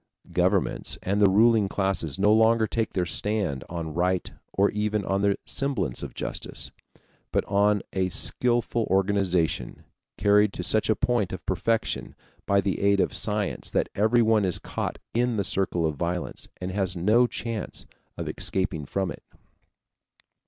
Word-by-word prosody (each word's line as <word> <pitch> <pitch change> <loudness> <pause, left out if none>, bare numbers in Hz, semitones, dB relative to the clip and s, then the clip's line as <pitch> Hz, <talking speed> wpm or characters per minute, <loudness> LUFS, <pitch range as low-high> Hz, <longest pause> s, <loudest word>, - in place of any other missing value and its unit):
Governments - - +1
and 100 +2 0
the 100 - +6
ruling 110 0 +4
classes 95 -8 -1
no 105 +2 +4
longer 110 0 +4
take 115 0 -2
their 90 -2 0
stand 95 - -1
on 85 -3 -4
right 90 +2 0 0.2
or 100 +1 +2
even 105 -1 -1
on 95 0 0
the 100 -1 +2
semblance 115 - -1
of - - -7
justice, - - -5 0.6
but - - +1
on 105 0 +2
a 95 -1 0
skillful 120 +3 +1
organization 95 -3 0 0.3
carried 105 0 +4
to - - -4
such 110 -1 +2
a 110 - +4
point 115 -6 0
of 95 -2 -7
perfection 110 +5 -1 0.3
by 100 0 +4
the 95 -1 -2
aid 100 0 +3
of - - +1
science 105 -2 -2
that - - 0
everyone 110 0 +3
is 90 -3 0
caught - - -4 0.2
in 120 0 +1
the 100 - 0
circle 90 -3 0
of 75 -2 -1
violence 85 +2 -3
and 90 0 -4
has 95 -2 -1
no 110 +8 +4
chance 115 -2 -5 0.3
of - - -4
escaping 95 -7 -2
from 95 +2 -1
it. - - -9
100 Hz, 155 wpm, -26 LUFS, 95-110 Hz, 0.6 s, the